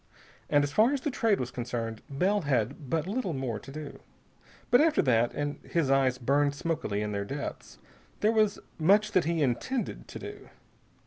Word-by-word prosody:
And 145 Hz, 0 st, +4 dB
as 145 Hz, -, -1 dB
far 225 Hz, -, +4 dB
as 280 Hz, -, -1 dB
the 295 Hz, -, -1 dB
Trade 225 Hz, -5 st, +2 dB
was 125 Hz, 0 st, -3 dB
concerned, 115 Hz, -3 st, -4 dB
Bell 190 Hz, +9 st, +1 dB
had 135 Hz, -, -1 dB
but 160 Hz, +1 st, 0 dB
little 200 Hz, -2 st, -2 dB
more 130 Hz, -6 st, -3 dB
to 135 Hz, -, -11 dB
do. 150 Hz, 0 st, -8 dB, 0.7 s
But 245 Hz, -, +7 dB
after 315 Hz, -1 st, +3 dB
that 120 Hz, -2 st, +3 dB
and 145 Hz, 0 st, -3 dB
his 160 Hz, -6 st, 0 dB
eyes 135 Hz, -2 st, +3 dB
burned 140 Hz, +3 st, +2 dB
smokily 140 Hz, -11 st, -2 dB
in 105 Hz, -, -3 dB
their 100 Hz, -1 st, -2 dB
depths 135 Hz, -, -6 dB, 0.4 s
there 215 Hz, -, +4 dB
was 215 Hz, -2 st, +2 dB, 0.2 s
much 205 Hz, +6 st, +4 dB
that 185 Hz, -, +3 dB
he 165 Hz, -1 st, +1 dB
intended 185 Hz, -, -2 dB
to -, -, -8 dB
do. -, -, -9 dB
145 Hz, 185 wpm, -29 LUFS, 125-200 Hz, 0.7 s, But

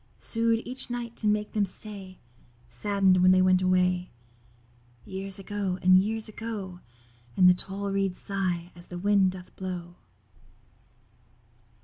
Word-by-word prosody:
Sued 230 Hz, 0 st, +3 dB
each 255 Hz, +1 st, 0 dB
night 240 Hz, -1 st, -5 dB
to 215 Hz, -, -2 dB
make 210 Hz, 0 st, 0 dB
them 210 Hz, -, 0 dB
stay, 195 Hz, -1 st, -8 dB, 0.5 s
Sadden'd 190 Hz, -, +1 dB
when 185 Hz, -, +5 dB
they 185 Hz, 0 st, +5 dB
went 185 Hz, 0 st, +3 dB
away. 180 Hz, -1 st, +1 dB, 1.0 s
Years 195 Hz, 0 st, +1 dB
ago, 195 Hz, -2 st, -3 dB
and 185 Hz, 0 st, +6 dB
years 220 Hz, +3 st, -1 dB
ago; 210 Hz, -5 st, -6 dB, 0.6 s
And 180 Hz, -, +6 dB
the 180 Hz, -, +7 dB
tall 195 Hz, +2 st, -4 dB
reeds 195 Hz, -2 st, -1 dB
sigh 180 Hz, -3 st, -3 dB
as 175 Hz, 0 st, -15 dB
the 175 Hz, -, -8 dB
wind 195 Hz, 0 st, +2 dB
doth 180 Hz, -1 st, -12 dB
blow. 180 Hz, -2 st, -7 dB
190 Hz, 135 wpm, -27 LUFS, 185-205 Hz, 1.0 s, the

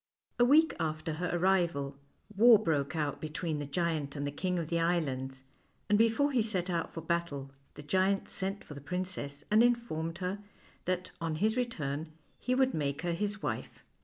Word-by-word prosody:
A 240 Hz, -, +7 dB
week 310 Hz, +5 st, +5 dB
after 155 Hz, 0 st, -2 dB
her 175 Hz, +3 st, -2 dB
arrival, 170 Hz, -6 st, +1 dB, 0.4 s
war 230 Hz, +2 st, +8 dB
broke 160 Hz, -7 st, 0 dB
out 150 Hz, -3 st, -1 dB
between 155 Hz, 0 st, -3 dB
the 145 Hz, -, -4 dB
giant 155 Hz, -2 st, -1 dB
and 140 Hz, 0 st, -2 dB
the 145 Hz, -, -2 dB
King 180 Hz, +5 st, -1 dB
of 165 Hz, -2 st, -3 dB
the 170 Hz, -, +1 dB
Islands, 135 Hz, -6 st, -1 dB, 0.5 s
and 210 Hz, -, +5 dB
before 230 Hz, +6 st, +3 dB
he 255 Hz, -4 st, +3 dB
set 190 Hz, -5 st, -1 dB
out 170 Hz, -1 st, -1 dB
for 165 Hz, -, -6 dB
battle, 160 Hz, -5 st, -2 dB, 0.2 s
the 150 Hz, -, -9 dB
giant 190 Hz, +5 st, +1 dB
sent 195 Hz, +1 st, -4 dB
for -, -, -10 dB
the 140 Hz, -, -9 dB
princess, 165 Hz, -4 st, -4 dB
and 215 Hz, +1 st, +6 dB
informed 235 Hz, -10 st, +1 dB
her 185 Hz, +2 st, -3 dB, 0.5 s
that 185 Hz, 0 st, -1 dB
on 165 Hz, -1 st, -1 dB
his 215 Hz, +7 st, +1 dB
return 155 Hz, -, -2 dB, 0.3 s
he 255 Hz, -, 0 dB
would 265 Hz, 0 st, +3 dB
make 145 Hz, 0 st, -1 dB
her 175 Hz, -1 st, 0 dB
his 205 Hz, +4 st, -2 dB
wife. -, -, -4 dB
170 Hz, 185 wpm, -31 LUFS, 150-200 Hz, 0.5 s, war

